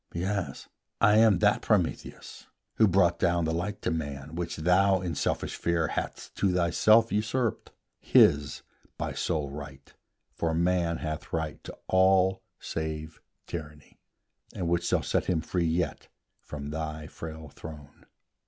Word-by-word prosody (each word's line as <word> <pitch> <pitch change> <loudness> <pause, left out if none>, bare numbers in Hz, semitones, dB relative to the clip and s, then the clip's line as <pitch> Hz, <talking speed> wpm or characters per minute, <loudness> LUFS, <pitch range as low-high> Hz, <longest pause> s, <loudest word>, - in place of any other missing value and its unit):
Yes, 95 +2 -3 0.3
I 105 +1 +5
am 110 -4 +6
that - - +3
Prometheus - - -2 0.3
who 110 - +6
brought 90 -2 +3
down 85 -2 +2
The 80 - -1
light 95 +5 -3
to - - 0
man, 70 -2 -4
which 85 0 -3
thou, 95 +4 +3
in 90 -2 -3
selfish - - -2
fear, 85 -2 0
Hadst - - -5
to 100 - +2
thyself 100 +6 +4
usurped, 110 +2 -1 0.3
his 70 0 +4 0.3
by - - -3
sole 75 -5 -2
right, 70 -1 -10 0.4
For 80 -1 -1
Man 85 0 +1
hath 80 +1 -5
right 80 -2 -3
to - - -9
all 95 0 +4 0.2
save 80 0 -5 0.2
Tyranny, 75 -3 -8 0.6
And 90 - -2
which 85 0 0
shall - - +1
free - - +1
him 80 -4 -1 0.3
yet 80 -2 -2 0.3
from 75 -1 -7
thy 80 0 -4
frail 80 0 -8
throne. 75 -2 -12
85 Hz, 140 wpm, -28 LUFS, 80-95 Hz, 0.6 s, am